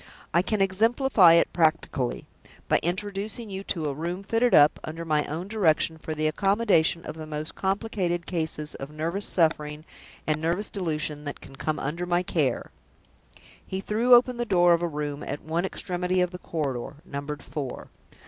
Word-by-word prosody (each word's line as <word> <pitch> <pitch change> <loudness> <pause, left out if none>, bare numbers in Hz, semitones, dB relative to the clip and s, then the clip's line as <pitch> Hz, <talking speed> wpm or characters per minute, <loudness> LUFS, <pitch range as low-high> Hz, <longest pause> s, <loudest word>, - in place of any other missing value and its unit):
I 170 - +5
can 210 +2 -1
exemplify 210 -1 +5
it 170 - +3
practically, 155 -6 0 0.4
by - - +3
introducing 205 +4 -3
you 190 0 -5
to 165 -4 -1
a 140 - -1
room 170 +6 -4
fitted 230 +4 +2
up, 145 0 +6
under 165 +2 -6
my 155 -2 +2
own 165 +5 -4
direction, 165 -6 +2
for 155 0 -5
the 155 0 -1
accommodation 195 -1 +2
of - - -5
the 155 0 -8
most 155 0 -5
complicated 190 -3 -1
cases 160 -3 -3
of 135 - -7
nervous 165 +6 -3
suffering 155 -2 0 0.4
and 155 0 0
nervous 175 +6 0
delusion 155 -5 -2
that 145 - -5
can 135 - -13
come 155 +3 -2
under 165 +6 -3
my 175 0 +2
care." 155 -7 -1 0.9
He 190 - -4
threw 230 +5 +4
open 245 0 +3
the 240 - 0
door 175 -5 +4
of 170 - +1
a 175 - +1
room 150 -2 -4
at 145 - -5
one 165 +3 -1
extremity 180 -1 -1
of 180 -1 +1
the 180 - -8
corridor, 140 -6 -3
numbered 145 -2 -6
Four. 135 -2 -6
170 Hz, 175 wpm, -26 LUFS, 155-195 Hz, 0.9 s, up